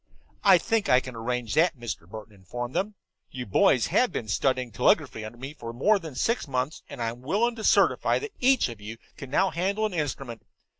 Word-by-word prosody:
"I 195 -2 +7
think 225 +3 0
I 125 - +6
can 130 -2 -9
arrange 115 -1 -3
that," 165 +1 +3
Mr. 110 -8 -6
Burton 110 +1 -10
informed 120 +6 -7
them. 205 +2 -1 0.3
"You 125 -1 -6
boys 115 +4 +3
have 250 - +3
been 110 - -4
studying 125 +3 0
telegraphy 110 - +1
under 110 +2 -8
me 135 +4 -7
for 115 -6 -8
more 200 - +3
than 160 -6 -9
six 230 - 0
months, 130 +3 -2
and - - -9
I'm 115 +1 -3
willing 210 - 0
to 220 - -6
certify - - +3
that 435 - -5
each 260 0 +4
of 115 -4 -9
you 110 +2 -7 0.2
can 135 -4 -9
now 190 +7 +2
handle 195 +5 0
an 215 - -2
instrument. 135 -7 -4
130 Hz, 205 wpm, -26 LUFS, 115-190 Hz, 0.3 s, I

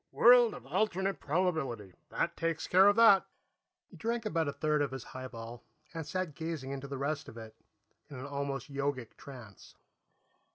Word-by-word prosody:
"World 240 -1 +6
of 125 - -11
alternate 190 +4 0
probability. 145 - -1 0.2
That - - -1
takes 165 -1 -2
care 190 +2 +6
of 205 - +5
that." 225 -4 +7 0.6
He - - -17
drank 230 0 -2
about 165 -7 0
a - - 0
third 150 0 0
of 145 - 0
his 130 -1 -7
highball 120 -2 -9 0.3
and 165 -2 -5
sat 185 -4 -3
gazing 160 -4 -5
into 140 0 -5
the 140 0 -5
rest 145 +2 -3
of 115 - -12
it, 110 -1 -10 0.5
in 140 - -9
an 130 - -7
almost 140 -1 -4
yogic 140 -4 -3
trance. 120 -8 -13
145 Hz, 170 wpm, -31 LUFS, 130-185 Hz, 0.6 s, that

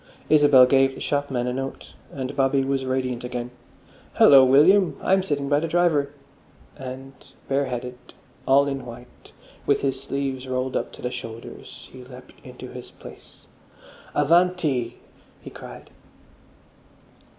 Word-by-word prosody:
Isabel 145 -4 +6
gave 135 +1 +2
the - - -10
shopman 140 -4 -2
a 125 - -2
note, 135 +1 -6 0.2
and 130 -2 -6
Bobby 135 0 +2
was 135 0 -2
radiant 130 -2 -2
again. 125 0 -5 0.6
"Hallo, 135 -2 +7
William! 160 +9 +4
I'm 190 +1 +2
sitting 145 -6 -3
by 145 +1 +2
the 165 - -3
driver." 160 -4 +1 0.7
And 135 +1 -9 0.3
bareheaded, 125 -2 -3 0.5
all 140 +1 +5
in 135 -2 -4
white, 120 +1 -13 0.4
with 140 - +2
his 135 -1 -2
sleeves 135 -1 -4
rolled 130 0 -3
up - - -2
to - - -13
the 125 - -2
shoulders, 115 -1 -9
he 130 -1 -11
leapt 125 0 -14
into - - -11
his - - -10
place. - - -15 0.7
"Avanti!" 155 -5 +1 0.4
he - - -11
cried.... - - -12
135 Hz, 135 wpm, -23 LUFS, 130-145 Hz, 0.7 s, Hallo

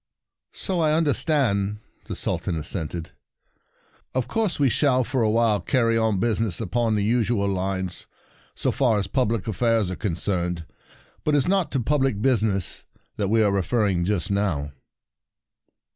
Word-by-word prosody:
"So 185 -3 -2
I 155 -2 +3
understand," 140 -10 +1 0.3
the - - -4
Sul - - -1
tan - - -3
assented. 80 +1 -3 0.5
" - - -32
Of 130 -1 0
course 215 - -1
we 140 - +4
shall 130 0 +3
for 130 +1 -1
a 110 - +2
while 110 -2 +2
carry 115 +5 +1
on 110 -3 +1
busi 110 0 +1
ness 105 -7 0
upon 115 +1 0
the 105 - 0
usual 115 -2 +1
lines, 95 -1 -3 0.5
so - - +1
far 120 -6 +2
as 100 - 0
public 115 -1 -1
affairs 110 -2 +1
are - - -3
con 95 -4 -2
cerned. 90 -2 -1 0.6
But 150 - +2
it - - +5
is 135 - +1
not 185 -5 +1
to 135 - +1
public 135 -3 +1
business 105 -6 0 0.3
that 100 - 0
we 110 +1 +4
are 100 - +3
referring 100 -2 +1
just 95 0 -1
now." 85 -8 -1
110 Hz, 165 wpm, -24 LUFS, 95-125 Hz, 0.6 s, it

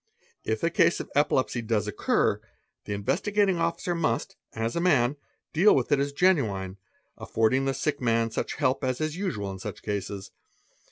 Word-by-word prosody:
If 110 0 -2
a 170 - +2
case 170 -4 +3
of - - -7
epilepsy 130 -4 +1
does 110 -2 -1
occur, 105 - +1 0.4
the 100 - -3
Investi: 175 - -1
gating 200 -4 +2
Officer 170 +1 -1
must, 170 -1 -1 0.2
as 115 +1 -2
a 170 - 0
man, 145 -7 +3 0.4
deal 190 +7 +5
with 130 - 0
it 145 - +4
as 140 +1 0
genuine, 110 - +1 0.4
affording 120 +5 +1
the 135 - +1
sie! 150 +4 0
man 115 -2 +1
such - - -3
help 130 - 0
as 130 -1 -1
is 155 0 -2
usual 120 - -3
in 95 - -8
such - - -7
cases. 100 -1 -4
130 Hz, 175 wpm, -27 LUFS, 110-170 Hz, 0.4 s, deal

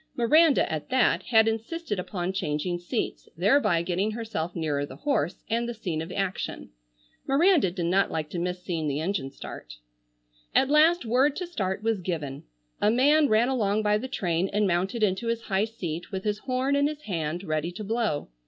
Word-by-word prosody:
Miranda, 300 +5 +4
at 155 - -4
that, 255 -2 +3
had 220 -2 +5
insisted 225 - -2
upon 180 0 -3
changing 175 0 -2
seats, 195 +7 -4
thereby 180 - +3
getting 185 +4 0
herself 215 -7 -4
nearer 150 -4 -1
the 145 - -7
horse, 190 - -1
and 235 +1 -1
the 240 - -4
scene 175 -8 -3
of 165 +3 -6
action. 190 - -3 0.6
Miranda 305 - +4
did 175 -1 -3
not 190 +3 +2
like 155 -1 -3
to 175 - -3
miss 180 +1 -3
seeing 165 -3 -2
the 145 0 -1
engine 165 -4 -2
start. - - -9 0.8
At 270 +1 +4
last 315 +1 +5
word 260 +5 +3
to 360 - -3
start 200 - -3
was 225 -3 0
given. 150 -6 -4 0.4
A 210 - +4
man 285 +5 +4
ran 220 +3 +4
along 215 -5 +1
by 210 0 +2
the 260 - -5
train 180 -7 -1
and 210 +1 +2
mounted 190 +5 0
into 205 +3 +1
his 230 0 -1
high 195 +1 +1
seat 175 -7 -6
with 190 -1 -4
his 210 0 -1
horn 260 +3 0
in 285 0 +3
his 300 0 -6
hand 170 -2 -3
ready 155 -1 -2
to 210 - -6
blow. 215 - -1
205 Hz, 190 wpm, -27 LUFS, 175-240 Hz, 0.8 s, had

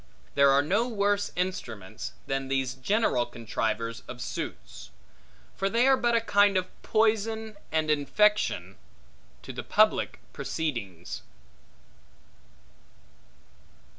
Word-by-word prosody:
There 140 0 +5
are 140 +1 +5
no 205 +10 +1
worse 205 -3 +1
instruments, 120 - -4
than 135 0 -2
these 135 -1 0
general 135 - +1
contrivers 115 0 -3
of - - -8
suits; 65 - -6 0.7
for 195 - 0
they 235 +4 +3
are 270 - +7
but 240 -2 +1
a 230 - +3
kind 205 -3 +4
of 185 0 -2
poison, 220 0 +1 0.2
and 155 -1 +1
infection, 150 - +2 0.7
to - - -7
public - - +2
proceedings. 100 - -4
160 Hz, 105 wpm, -28 LUFS, -, 0.7 s, are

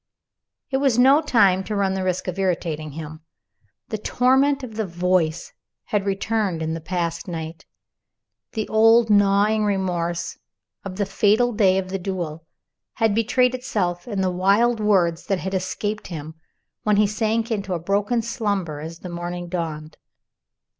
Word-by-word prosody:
It 265 - +2
was 270 -4 +2
no 270 +5 +6
time 200 -10 +3
to 210 - -3
run 195 -1 +1
the 190 0 -2
risk 185 0 -2
of 185 +1 -4
irritating 165 -5 -2
him. 155 0 -8 0.7
The 215 - -3
torment 265 +5 +2
of 240 -4 -7
the 215 -2 -2
Voice 175 -2 0 0.3
had 205 -1 -1
returned 195 -3 -1
in 160 0 -2
the 165 - -5
past 170 0 -3
night. 165 -1 -6 0.9
The 220 -1 -2
old 225 +1 +5
gnawing 205 +1 +4
remorse 175 -4 -1 0.4
of 195 -2 -6
the 200 +1 0
fatal 225 +5 +2
day 195 -3 +3
of 190 -1 -2
the 195 +1 -3
duel 170 -4 -5 0.5
had 225 -2 +1
betrayed 245 +3 +2
itself 205 -9 -2
in 205 -5 -2
the 185 -1 +1
wild 200 +6 +2
words 185 -6 +2
that 195 - +1
had 190 +1 -4
escaped 200 +3 -3
him, 160 -2 -7 0.5
when 210 -1 +2
he 210 - +5
sank 220 +2 -1
into 200 -4 -2
a - - -3
broken 205 +6 0
slumber 200 -9 -2
as 160 +2 -7
the - - -7
morning 175 0 -5
dawned. 160 -3 -4
195 Hz, 160 wpm, -23 LUFS, 175-220 Hz, 0.9 s, no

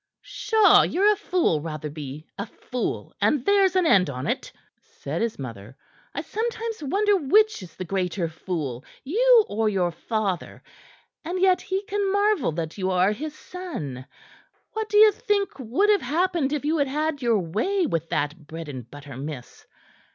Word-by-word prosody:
"Pshaw! 440 -2 +4
Ye're 410 +4 +3
a - - -4
fool, 360 - +1
Rotherby 150 -2 -6
a 200 +2 -5
fool, 250 +3 -4
and 285 -5 +2
there's 395 -2 +4
an 370 -2 +3
end 190 - +4
on't," 130 -1 -3 0.3
said 150 +5 -6
his 230 -1 -1
mother. 115 -2 -8 0.4
"I - - -1
sometimes 455 -1 -3
wonder 400 +8 +2
which 420 - +3
is 185 - -11
the 185 - -5
greater 180 -1 -1
fool 155 -6 -4 0.2
you 460 - +5
or 220 +1 0
your 185 -4 0
father. 195 0 -3 0.6
And 350 +3 -3
yet 370 -1 +4
he 380 +1 -2
can 405 -1 -1
marvel 405 - +2
that 165 +3 -4
you 190 0 0
are 185 +2 +3
his 305 +7 -5
son. 155 - -7 0.7
What 440 0 -3
do 415 - +2
ye 430 0 +9
think 405 -5 -1
would 265 - +2
have 410 - +3
happened 330 +1 0
if 295 -1 -2
you 315 +1 +1
had 285 - +2
had 300 +1 -1
your 235 -3 +3
way 220 - 0
with 165 - -2
that 150 +1 -2
bread 165 -1 -7
and 125 -4 -8
butter 145 -1 -10
miss? 140 -2 -8
250 Hz, 165 wpm, -25 LUFS, -, 0.7 s, ye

